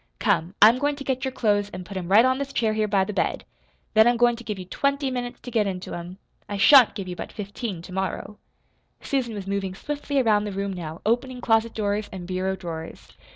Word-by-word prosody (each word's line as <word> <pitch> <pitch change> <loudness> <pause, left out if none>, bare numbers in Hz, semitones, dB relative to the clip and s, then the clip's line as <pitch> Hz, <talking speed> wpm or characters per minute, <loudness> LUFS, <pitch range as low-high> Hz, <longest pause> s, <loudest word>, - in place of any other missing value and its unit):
Come, 170 - 0
I'm 230 +4 +7
goin' 290 +1 +1
to 280 - -8
get 260 -1 -2
your 265 - -1
clothes 205 -5 +1
an' 185 - -7
put 195 +2 -10
'em 180 -2 -4
right 215 +5 +7
on 260 +1 +2
this 280 0 -4
chair 225 -5 +1
here 215 0 0
by 195 -2 +2
the 210 - -4
bed; - - -1 0.5
then 220 +1 +6
I'm 240 0 +3
goin' 240 0 +4
to 240 - -11
give 210 -3 -4
you 185 - -7
twenty 280 +7 -1
minutes 245 -1 -4
to 245 - -8
get 220 -3 +2
into 185 -1 -5
'em. 175 +2 -7 0.3
I 205 - -3
shan't 255 +3 +7
give 195 -3 -5
you 180 - -5
but - - -7
fifteen 205 -3 -6
tomorrow." 190 +3 -4 0.6
Susan 250 -5 -2
was 200 -2 -6
moving 195 -1 -3
swiftly 290 +3 -2
around 215 -4 +3
the 205 - -3
room 195 0 -2
now, 165 -3 -7
opening 250 +3 0
closet 225 -1 +1
doors 205 0 -1
and 185 -2 -7
bureau 185 +1 -1
drawers. 165 -3 -8
210 Hz, 230 wpm, -24 LUFS, 190-245 Hz, 0.6 s, I'm